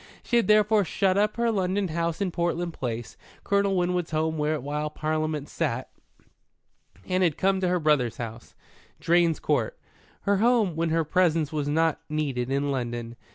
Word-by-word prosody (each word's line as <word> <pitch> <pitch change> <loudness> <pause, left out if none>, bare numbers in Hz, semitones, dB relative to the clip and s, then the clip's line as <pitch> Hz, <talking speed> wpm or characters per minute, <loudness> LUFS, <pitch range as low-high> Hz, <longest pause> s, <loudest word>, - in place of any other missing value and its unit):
She 240 - +1
had 235 - +2
therefore 210 0 +4
shut 185 +1 +1
up 210 +2 +1
her 235 0 +2
London 190 -1 0
house 170 +2 -2
in 190 -2 0
Portland 170 0 -1
Place, 120 - -5 0.3
Colonel 200 -1 +1
Winwood's 180 -1 0
home 160 0 0
while 150 0 -1
Parliament 155 -1 -2
sat, 130 -6 -3 1.2
and 185 0 +1
had 170 -5 +2
come 190 0 +1
to 185 - +1
her 180 0 +1
brother's 150 -7 +1
house, 115 0 -8 0.4
Drane's 170 -1 +2
Court, - - 0 0.4
her 200 0 +2
home 220 -5 +3
when 165 0 0
her 165 +1 +2
presence 165 -2 +1
was 150 -2 -1
not 160 +1 +1
needed 140 -5 -2
in 140 +1 0
London. 120 -2 -4
165 Hz, 160 wpm, -26 LUFS, 150-185 Hz, 1.2 s, therefore